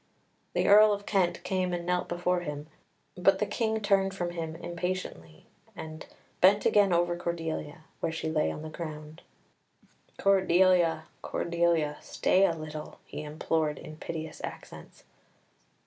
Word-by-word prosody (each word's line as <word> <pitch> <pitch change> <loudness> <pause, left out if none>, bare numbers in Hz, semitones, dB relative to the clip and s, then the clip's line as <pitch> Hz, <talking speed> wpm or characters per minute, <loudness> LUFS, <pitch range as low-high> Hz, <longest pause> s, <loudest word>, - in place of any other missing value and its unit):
The - - +1
Earl 210 +1 +8
of 205 0 -5
Kent 190 -4 +1
came 185 -1 -1
and 170 0 -5
knelt 180 0 0
before 175 +1 0
him, 150 -3 -5 0.5
but - - +4
the - - 0
King 220 -2 -1
turned 195 -2 +2
from 175 -2 -2
him 165 -2 -5
impatiently, 170 - -5 0.3
and 155 0 -8 0.3
bent 195 +3 +5
again 205 -2 +4
over 175 0 +2
Cordelia, 165 -2 -4 0.2
where 165 - -1
she 160 0 -4
lay 155 -1 +1
on 150 - -6
the 155 - -6
ground. 155 -1 -8 1.0
"Cordelia, 185 -4 +4 0.2
Cordelia! 170 -3 0
Stay 195 +1 +3
a 165 - -1
little!" 155 -1 -7
he - - -7
implored 155 0 -1
in 155 - -9
piteous 160 0 -6
accents. - - -9
170 Hz, 140 wpm, -29 LUFS, 155-185 Hz, 1.0 s, Earl